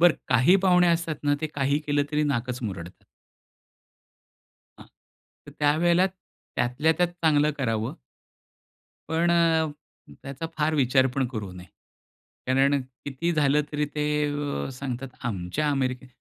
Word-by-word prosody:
बरं, 175 -1 +6
काही 125 +9 +5
पाहुणे 180 -1 +5
असतात 165 -2 0
ना 145 0 +3
ते 155 - -1
काही 140 +1 +1
केलं 145 -1 +2
तरी 150 0 +2
नाकच 125 -3 -2
मुरडतात. 90 -5 -7 1.8
हां. - - -13 0.6
तर - - -9
त्यावेळेला 170 +5 +3 0.5
त्यातल्या 125 +6 +1
त्यात 180 - +3
चांगलं 150 -2 +3
करावं. 115 -1 -1 1.2
पण 165 +2 +2
अ, 165 -2 +3 0.6
त्याचा 140 +3 -6
फार 155 +1 +1
विचार 130 -1 +3
पण 135 -1 +1
करू 110 -6 -6
नये. 90 0 -11 0.8
कारण 135 +2 +3
किती 130 +5 -4
झालं 150 -1 +3
तरी 150 0 0
ते 150 - 0 0.6
अ, - - -5
सांगतात 130 0 -5 0.2
आमच्या 110 +7 -2
अमेरिकेत. 130 -2 -1
145 Hz, 130 wpm, -26 LUFS, 125-155 Hz, 1.8 s, बरं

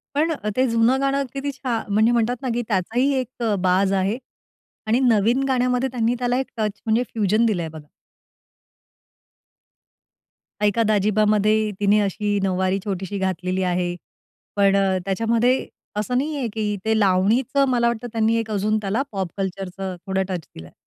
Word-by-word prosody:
पण 315 +3 +2
अ, 210 -9 -4
ते 260 - +3
जुनं 230 +3 +3
गाणं 275 0 +1
किती 275 +1 -2
छान 240 -6 -3
म्हणजे 220 +3 +4
म्हणतात 235 +1 +1
ना, 260 - -2
की 240 - 0
त्याचाही 230 +7 +1
एक 250 -1 -8
अ, 220 -3 +1
बाज 190 +2 +3
आहे, 200 +5 -1 0.7
आणि 230 +4 +2
नवीन 230 +4 +3
गाण्यामध्ये 250 0 +1
त्यांनी 235 -1 +1
त्याला 245 0 0
एक 265 - -3
टच, 210 -2 -2
म्हणजे 225 +2 +2
फ्यूजन 215 +1 +2
दिलंय, 175 -7 -1
बघा. 155 -1 -11 2.8
"ऐका 210 +2 +3
दाजीबा"मध्ये 215 +1 +2
तिने 205 +1 +4
अशी 205 +1 0
नऊवारी 190 0 +1
छोटीशी 195 0 -3
घातलेली 185 0 -1
आहे. 180 -1 0 0.6
पण 200 -1 +4 0.3
त्याच्यामध्ये 230 +5 +1 0.3
असं 230 +4 0
नाहीये, 285 -2 -2
की 210 -1 -2
ते 220 0 +2
लावणीचं 220 +8 +2
मला 240 -2 +2
वाटतं, 235 0 -3
त्यांनी 225 0 +2
एक 225 -1 -6
अजून 215 +1 +1
त्याला 205 +6 0
पॉप 190 -3 -2
कल्चरचं 190 -1 -4
थोडं 190 0 0
टच 175 -6 -4
दिलंय. 80 0 -11
215 Hz, 150 wpm, -22 LUFS, 195-240 Hz, 2.8 s, म्हणजे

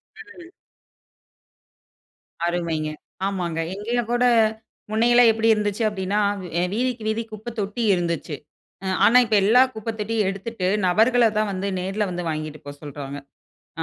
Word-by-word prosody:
ம். 360 -5 -13 2.0
அருமைங்க. 165 -3 -1 0.4
ஆமாங்க. 175 -4 -3 0.2
இங்கயும் 230 +3 -2
கூட 245 +1 +2 0.7
முன்ன 220 +2 +2
எல்லாம் 240 -1 +7
எப்படி 225 0 0
இருந்துச்சு 210 +1 -1
அப்படின்னா, 200 0 -1 0.2
வ் 180 - -7 0.3
வீதிக்கு 245 0 -1
வீதி 220 +1 -1
குப்ப 215 +2 -7
தொட்டி 205 +4 -3
இருந்துச்சு. 170 -3 -2 0.5
ம் 190 0 0
ஆனா 245 - +6
இப்ப 220 -1 +1
எல்லா 225 +6 +6
குப்பை 220 +1 -4
தொட்டியும் 210 -1 0
எடுத்துட்டு 195 0 -4 0.2
நபர்களை 230 +6 +4
தான் 215 -1 +1
வந்து 190 +1 -3
நேர்ல 195 +3 -2
வந்து 175 0 -4
வாங்கிட்டு 155 -1 -4
போ 145 - -6
சொல்றாங்க. 145 -1 -7 0.6
அ - - +1
205 Hz, 140 wpm, -23 LUFS, 180-230 Hz, 2.0 s, எல்லாம்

